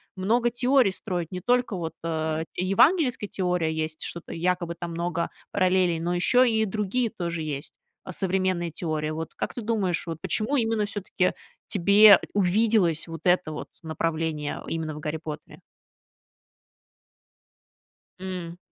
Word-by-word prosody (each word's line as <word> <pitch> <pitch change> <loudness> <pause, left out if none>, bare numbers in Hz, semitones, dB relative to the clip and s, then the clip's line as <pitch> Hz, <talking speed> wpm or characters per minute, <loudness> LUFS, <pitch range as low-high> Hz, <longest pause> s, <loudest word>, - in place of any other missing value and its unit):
много 230 +6 +2
теорий 245 -2 +3
строить. 180 -4 -4
Не 180 - -4
только 245 -2 +1
вот, 165 -3 -4
э, 160 0 -1
евангельская 240 - +3
теория 180 -4 0
есть, 155 0 -3
что-то 170 - -5
якобы 175 0 -1
там 170 0 -6
много 170 0 -2 0.2
параллелей, 185 -3 +2
но 175 +2 -1
ещё 245 +8 +4
и 220 -3 +2
другие 215 +3 -1
тоже 170 -6 -4
есть 145 -1 -5 0.4
современные 185 -2 0
теории. 155 -2 -2
Вот 160 +1 -5
как - - -3
ты 240 - -5
думаешь, 205 -7 -1
вот 165 -1 -4
почему 220 - 0
именно 225 -3 +1
всё-таки 200 -3 -1 0.3
тебе 200 +1 +7
увиделось 200 -4 +2
вот 165 -1 -7
это 180 -3 +3
вот 155 - -6 0.2
направление 160 -2 -2
именно 160 -1 -3
в - - -7
"Гарри 155 0 -3
Поттере"? 155 -2 -8 2.6
М,, 180 -2 -6
180 Hz, 135 wpm, -26 LUFS, 165-210 Hz, 2.6 s, тебе